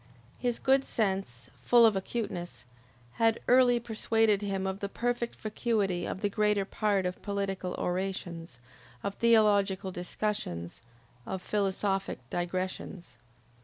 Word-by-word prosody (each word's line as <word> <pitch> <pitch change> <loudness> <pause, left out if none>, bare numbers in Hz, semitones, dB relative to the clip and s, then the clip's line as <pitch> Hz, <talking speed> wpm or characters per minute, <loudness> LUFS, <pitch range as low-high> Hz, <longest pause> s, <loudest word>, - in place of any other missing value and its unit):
His 245 -2 0
good 270 0 +3
sense, 190 - -2
full 240 -1 +6
of 220 -2 +4
acuteness, 190 - -4 0.6
had 225 0 +4
early 245 -1 +5
persuaded 225 -2 +1
him 195 -2 -2
of 190 0 -2
the 200 - -3
perfect 240 +1 -2
vacuity 210 -5 -1
of 190 - -5
the 205 - +2
greater 210 -2 +2
part 200 -2 0
of 180 0 -3
political 195 -2 -2
orations, 175 -5 -3 0.5
of 200 - -2
theological 205 -4 +3
discussions, 175 - -4 0.5
of 190 - -3
philosophic 195 0 -1
digressions. 185 +1 -4
200 Hz, 120 wpm, -30 LUFS, 185-225 Hz, 0.6 s, full